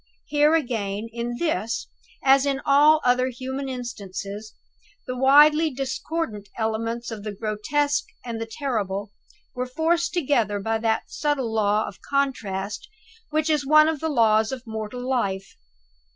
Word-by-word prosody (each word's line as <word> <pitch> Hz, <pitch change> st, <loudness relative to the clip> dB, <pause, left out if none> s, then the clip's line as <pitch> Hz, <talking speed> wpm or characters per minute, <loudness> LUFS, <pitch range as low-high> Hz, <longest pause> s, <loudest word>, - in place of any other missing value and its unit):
Here 295 Hz, +1 st, +3 dB
again, 225 Hz, -7 st, -2 dB
in 240 Hz, +1 st, -3 dB
this, 315 Hz, -9 st, -1 dB, 0.4 s
as 275 Hz, +1 st, +5 dB
in 275 Hz, -1 st, 0 dB
all 300 Hz, +3 st, +6 dB
other 250 Hz, +1 st, +3 dB
human 265 Hz, +2 st, -5 dB
instances, 215 Hz, -4 st, -6 dB, 0.5 s
the 255 Hz, -, -4 dB
widely 295 Hz, +5 st, +6 dB
discordant 265 Hz, -4 st, -4 dB
elements 230 Hz, +1 st, -2 dB
of 220 Hz, -2 st, -6 dB
the 210 Hz, -, -4 dB
grotesque 235 Hz, +9 st, -1 dB, 0.2 s
and 230 Hz, -2 st, -4 dB
the 225 Hz, -, -3 dB
terrible 210 Hz, -6 st, -3 dB, 0.4 s
were 250 Hz, 0 st, -3 dB
forced 330 Hz, +5 st, +1 dB
together 240 Hz, -, +1 dB
by 225 Hz, +2 st, -1 dB
that 220 Hz, 0 st, -1 dB
subtle 275 Hz, -6 st, -1 dB
law 210 Hz, 0 st, +2 dB
of 175 Hz, -, -10 dB
contrast 240 Hz, -, -2 dB, 0.4 s
which 310 Hz, 0 st, 0 dB
is 305 Hz, -2 st, +2 dB
one 305 Hz, +2 st, +6 dB
of 320 Hz, -2 st, -1 dB
the 320 Hz, -, -1 dB
laws 220 Hz, -4 st, +3 dB
of 260 Hz, -1 st, -6 dB
mortal 220 Hz, +3 st, -5 dB
life. 195 Hz, -7 st, -1 dB
250 Hz, 140 wpm, -24 LUFS, 220-290 Hz, 0.5 s, all